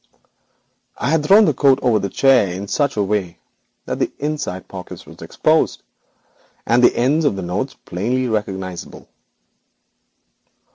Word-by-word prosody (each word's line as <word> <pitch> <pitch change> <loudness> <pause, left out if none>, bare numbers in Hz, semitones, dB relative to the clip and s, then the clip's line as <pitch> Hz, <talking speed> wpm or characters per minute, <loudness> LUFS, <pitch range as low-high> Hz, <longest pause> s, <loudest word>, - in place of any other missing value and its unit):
I 130 - -1
had 160 -2 +2
thrown 205 +7 +6
the - - +2
coat 135 -2 +4
across 120 -6 +1
the 100 - -3
chair 130 -1 +4
back 90 - -5
in 100 +1 -6
such 140 +2 -1
a 105 - +2
way 95 -4 -2 0.5
that - - -4
the - - 0
inside 145 -11 -4
pocket 95 -2 -9
was - - -15
exposed, - - 0 0.8
leaving 120 +2 +3
the 120 - +5
ends 140 +7 +2
of 145 - +1
the 95 - -5
notes 100 +10 -3
plainly 125 +8 -1
recognisable. 95 -5 -5
115 Hz, 150 wpm, -19 LUFS, 95-140 Hz, 0.8 s, thrown